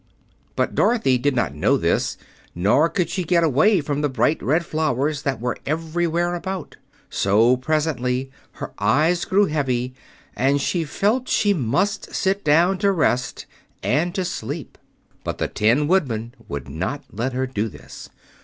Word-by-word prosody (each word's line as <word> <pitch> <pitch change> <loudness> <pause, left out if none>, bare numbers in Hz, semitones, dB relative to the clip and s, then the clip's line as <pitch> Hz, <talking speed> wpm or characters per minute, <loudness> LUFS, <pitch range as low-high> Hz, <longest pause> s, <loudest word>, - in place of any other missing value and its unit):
But - - 0
Dorothy 135 - +2
did 140 +2 +1
not 115 - 0
know 75 - +2
this, - - 0 0.4
nor 105 - +3
could 180 -1 0
she 185 - -2
get 170 0 +2
away 165 - +4
from 145 0 -2
the 150 - +1
bright 130 +4 +1
red 160 +6 +1
flowers 150 -2 0
that 135 -5 -2
were 125 +1 -3
everywhere 170 +2 -1
about; 185 0 -5 0.3
so 110 +5 +3
presently 130 -2 -1 0.2
her - - -7
eyes 165 +5 +2
grew 200 +2 +3
heavy 130 -6 -1 0.4
and 140 +2 +2
she 165 +4 0
felt 220 - 0
she 205 -1 +3
must 175 - -1
sit 195 +1 0
down 170 +5 +3
to 200 -1 +3
rest 125 -8 0 0.4
and 170 +7 +1
to 190 -3 -1
sleep. 145 -2 -5 0.4
But - - -3
the - - -1
Tin 120 +8 +2
Woodman 120 - 0
would 70 -2 -5
not 130 - -4
let 120 +5 -2
her 130 +1 0
do 115 -4 -2
this. - - -12
145 Hz, 155 wpm, -22 LUFS, 125-175 Hz, 0.4 s, away